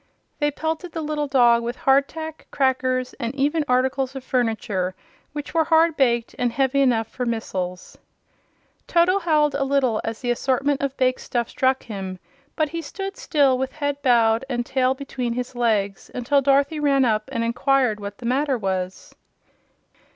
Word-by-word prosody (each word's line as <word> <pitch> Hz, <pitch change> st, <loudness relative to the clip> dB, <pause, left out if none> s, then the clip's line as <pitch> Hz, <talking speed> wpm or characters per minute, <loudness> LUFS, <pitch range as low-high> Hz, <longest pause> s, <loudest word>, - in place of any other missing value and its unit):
They 295 Hz, -1 st, +2 dB
pelted 320 Hz, +4 st, -4 dB
the 325 Hz, -, -3 dB
little 300 Hz, -1 st, -2 dB
dog 240 Hz, -4 st, +4 dB
with 240 Hz, +1 st, -3 dB
hard 270 Hz, +2 st, +3 dB
tack, 315 Hz, -1 st, -8 dB
crackers, 255 Hz, -2 st, 0 dB
and 235 Hz, +3 st, -3 dB
even 295 Hz, +3 st, +1 dB
articles 260 Hz, +1 st, +1 dB
of 265 Hz, -, -6 dB
furniture 220 Hz, -7 st, -1 dB, 0.4 s
which 295 Hz, -1 st, -6 dB
were 325 Hz, -1 st, +3 dB
hard 325 Hz, 0 st, +4 dB
baked 240 Hz, -5 st, +1 dB
and 245 Hz, -1 st, +1 dB
heavy 270 Hz, +2 st, +1 dB
enough 240 Hz, -4 st, +2 dB
for 250 Hz, -, -5 dB
missiles. 185 Hz, -6 st, -4 dB, 0.9 s
Toto 355 Hz, +3 st, +3 dB
howeled 305 Hz, -5 st, +2 dB
a 280 Hz, -, 0 dB
little 265 Hz, -5 st, +1 dB
as 225 Hz, 0 st, -4 dB
the 245 Hz, -2 st, -1 dB
assortment 270 Hz, +3 st, 0 dB
of 275 Hz, -1 st, -2 dB
bake 255 Hz, 0 st, +2 dB
stuff 240 Hz, -2 st, -2 dB
struck 260 Hz, 0 st, +1 dB
him; 195 Hz, -4 st, -6 dB, 0.4 s
but 310 Hz, -2 st, +1 dB
he 335 Hz, +1 st, -4 dB
stood 390 Hz, +6 st, -6 dB
still, 275 Hz, -5 st, +2 dB
with 265 Hz, 0 st, -2 dB
head 285 Hz, -2 st, -3 dB
bowed 230 Hz, -3 st, +3 dB
and 240 Hz, -2 st, -1 dB
tail 260 Hz, 0 st, +1 dB
between 260 Hz, -3 st, -4 dB
his 250 Hz, +1 st, -4 dB
legs, 215 Hz, -5 st, 0 dB
until 275 Hz, +3 st, +2 dB
Dorothy 280 Hz, +3 st, +2 dB
ran 275 Hz, -3 st, +3 dB
up 215 Hz, 0 st, 0 dB
and 230 Hz, -3 st, -1 dB
inquired 250 Hz, -1 st, +1 dB
what 200 Hz, 0 st, -7 dB
the 245 Hz, -, -10 dB
matter 270 Hz, +2 st, +1 dB
was. 190 Hz, -3 st, -4 dB
260 Hz, 170 wpm, -23 LUFS, 235-285 Hz, 0.9 s, dog